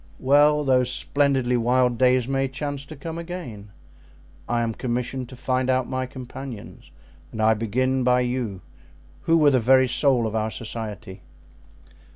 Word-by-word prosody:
"Well, 145 Hz, +2 st, +4 dB
those 130 Hz, -2 st, +2 dB
splendidly 135 Hz, -3 st, +1 dB
wild 125 Hz, 0 st, +1 dB
days 125 Hz, -1 st, +3 dB
may 135 Hz, 0 st, 0 dB
chance 140 Hz, +1 st, -5 dB
to 155 Hz, -, -9 dB
come 160 Hz, +3 st, -6 dB
again; 165 Hz, -, -8 dB, 0.8 s
I 120 Hz, 0 st, +1 dB
am 115 Hz, -1 st, -1 dB
commissioned 125 Hz, +1 st, -3 dB
to 130 Hz, -, -10 dB
find 130 Hz, +1 st, -1 dB
out 130 Hz, -1 st, +1 dB
my 130 Hz, 0 st, -3 dB
companions 130 Hz, -3 st, -9 dB, 0.4 s
and 110 Hz, -, -8 dB
I 110 Hz, +1 st, +4 dB
began 130 Hz, +4 st, 0 dB
by 125 Hz, 0 st, +3 dB
you, 120 Hz, -6 st, -3 dB, 0.6 s
who 165 Hz, -, +4 dB
were 150 Hz, -3 st, +5 dB
the 130 Hz, -, +3 dB
very 130 Hz, +2 st, +4 dB
soul 125 Hz, -1 st, +2 dB
of 110 Hz, -, -3 dB
our 110 Hz, 0 st, -1 dB
society." 110 Hz, -4 st, -7 dB
130 Hz, 155 wpm, -23 LUFS, 120-135 Hz, 0.8 s, were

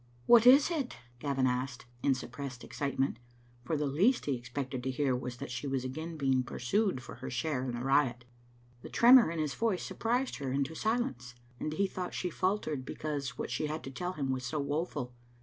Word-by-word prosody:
"What 240 Hz, 0 st, +7 dB
is 280 Hz, +6 st, +8 dB
it?" 290 Hz, -7 st, -2 dB, 0.2 s
Gavin 135 Hz, -1 st, 0 dB
asked, 125 Hz, 0 st, -1 dB, 0.2 s
in 135 Hz, -, +3 dB
suppressed 125 Hz, 0 st, -7 dB
excitement, 135 Hz, +1 st, -1 dB, 0.5 s
for 155 Hz, +5 st, -1 dB
the 150 Hz, -, 0 dB
least 185 Hz, -, +3 dB
he 145 Hz, -, +1 dB
expected 125 Hz, +1 st, -4 dB
to 130 Hz, -, -2 dB
hear 130 Hz, 0 st, +1 dB
was 125 Hz, 0 st, -5 dB
that 140 Hz, 0 st, -6 dB
she 125 Hz, +3 st, -4 dB
was 135 Hz, -2 st, -1 dB
again 160 Hz, +5 st, -5 dB
being 135 Hz, -3 st, +2 dB
pursued 130 Hz, -, 0 dB
for -, -, -9 dB
her 130 Hz, -, -6 dB
share 125 Hz, +1 st, -1 dB
in 125 Hz, -2 st, -3 dB
the 120 Hz, -, -4 dB
riot. 130 Hz, -3 st, +2 dB, 0.6 s
The -, -, -9 dB
tremor 245 Hz, -3 st, +7 dB
in 170 Hz, -, -4 dB
his 155 Hz, -3 st, -1 dB
voice 220 Hz, -6 st, 0 dB
surprised 245 Hz, +3 st, -1 dB
her 135 Hz, -2 st, -3 dB
into 140 Hz, +3 st, 0 dB
silence, 160 Hz, -, -2 dB, 0.2 s
and 155 Hz, -, -2 dB
he 200 Hz, +5 st, +2 dB
thought 185 Hz, -1 st, -4 dB
she 180 Hz, -, -2 dB
faltered 170 Hz, -7 st, -1 dB
because 140 Hz, -3 st, -4 dB
what -, -, -4 dB
she 140 Hz, +5 st, -1 dB
had 155 Hz, +1 st, -4 dB
to 135 Hz, -, -6 dB
tell 180 Hz, +7 st, -3 dB
him 140 Hz, -5 st, -2 dB
was 130 Hz, -1 st, -2 dB
so 155 Hz, -, -3 dB
woeful. 145 Hz, -3 st, -2 dB
140 Hz, 200 wpm, -32 LUFS, 130-170 Hz, 0.6 s, is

